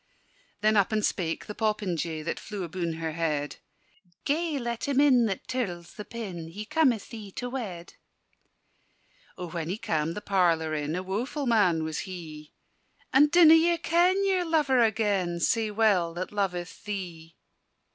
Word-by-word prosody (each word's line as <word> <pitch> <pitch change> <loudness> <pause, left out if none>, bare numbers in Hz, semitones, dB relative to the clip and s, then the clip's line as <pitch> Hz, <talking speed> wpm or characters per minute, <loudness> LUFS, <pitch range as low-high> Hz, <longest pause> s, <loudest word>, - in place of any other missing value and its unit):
Then 215 0 +3
up 200 +2 +3
and 215 -1 +1
spake 165 -4 -2
the 210 - -6
popinjay 180 -8 -2
That 170 - -3
flew 205 -3 -6
abune 170 0 -3
her 160 0 -4
head: 155 -3 -2 0.7
"Gae 315 +1 0
let 235 -1 -3
him 280 -1 +1
in 255 -5 +5
that 195 -3 -4
tirls 180 -10 -4
the 210 - -7
pin: 195 -7 -6
He 200 +6 -7
cometh 260 -6 +1
thee 215 -4 -8
to 245 0 -5
wed." 190 -10 -6 1.4
O 180 - -5
when 165 -1 -4
he 190 - -2
cam' 165 -7 -1
the - - -3
parlour 170 -6 +1
in, 150 +1 -2
A 180 - -3
woeful 240 +10 -3
man 195 -9 +3
was 155 -1 -3
he! 155 -4 -9 0.6
"And 290 +3 +6
dinna 335 -1 +8
ye 335 +1 +4
ken 360 +4 +2
your 380 -2 +2
lover 300 -7 +2
agen, 200 -6 +1
Sae 225 +4 +1
well 200 -6 +2
that 185 +1 -4
loveth 180 -4 -3
thee?" 175 -5 -6
205 Hz, 160 wpm, -27 LUFS, 170-245 Hz, 1.4 s, dinna